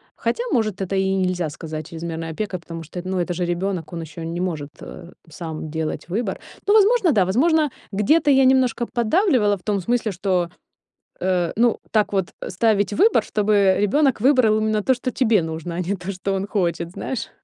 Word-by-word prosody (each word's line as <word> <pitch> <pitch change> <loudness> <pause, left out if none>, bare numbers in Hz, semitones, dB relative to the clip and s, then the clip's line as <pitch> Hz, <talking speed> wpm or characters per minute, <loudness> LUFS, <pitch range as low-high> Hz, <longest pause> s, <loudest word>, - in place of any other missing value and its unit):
хотя, 475 - -1
может, 215 -5 0
это 195 +1 -2
и 190 0 +1
нельзя 180 -3 -1
сказать 155 0 -7
чрезмерной 165 0 -5
опекой, 185 +1 -4
потому 165 -1 -8
что, 175 +3 -7
ну, 185 0 -2
это 175 0 -1
же 175 0 -2
ребёнок, 175 0 -2
он 170 - -4
ещё 165 +1 -8
не 175 - -3
может, 155 -6 -3
э, 175 0 -10 0.2
сам 160 -1 -6
делать 160 +1 -4
выбор. 205 +1 -1 0.3
Ну, 410 - +5
возможно, 425 -4 +5
да. 205 -6 +4
Возможно, 305 - +3 0.2
где-то 290 +10 +3
я 270 -1 +5
немножко 255 -2 +3
поддавливала 240 - +2
в 185 - -14
том 210 -2 0
смысле, 230 +2 0
что, 180 -2 0 0.7
э, 180 -2 0
ну, 235 +1 +3
так 215 -2 +1
вот, 190 -3 0
э, - - -4
ставить 205 +1 +1
выбор, 425 - +4
чтобы 210 0 +2 0.4
ребёнок 275 -1 +2
выбрал 250 -6 +4
именно 215 -1 0
то, 260 - +3
что 255 +1 -3
тебе 225 -8 +2
нужно, 160 +1 -5
а 175 - -2
не 190 +3 -2
то, 185 +2 -5
что 195 +1 -3
он 195 +1 -2
хочет, 170 -4 -1
знаешь. 250 +5 -4
195 Hz, 195 wpm, -22 LUFS, 170-235 Hz, 0.7 s, Ну